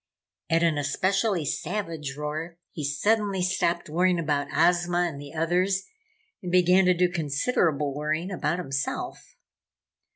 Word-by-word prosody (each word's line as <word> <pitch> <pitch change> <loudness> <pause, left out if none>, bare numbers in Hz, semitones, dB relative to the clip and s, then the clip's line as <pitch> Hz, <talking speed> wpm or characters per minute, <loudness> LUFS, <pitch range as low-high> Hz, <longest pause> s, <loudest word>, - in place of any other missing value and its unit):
At 165 +1 +3
an 160 -3 +2
especially 185 +5 0
savage 160 -5 -3
roar, 155 +3 -4
he 155 - -6
suddenly 195 +7 +1
stopped 180 -2 0
worrying 175 +3 +2
about 145 -3 0
Ozma 175 +1 +2
and 140 -4 -7
the 145 -1 -9
others 180 +4 +1 0.6
and 180 - -5
began 180 +1 +5
to 180 0 +4
do 180 +1 +3
considerable 150 - 0
worrying 155 +5 -2
about 170 -2 -1
himself. 135 -6 -4
170 Hz, 130 wpm, -26 LUFS, 150-180 Hz, 0.6 s, began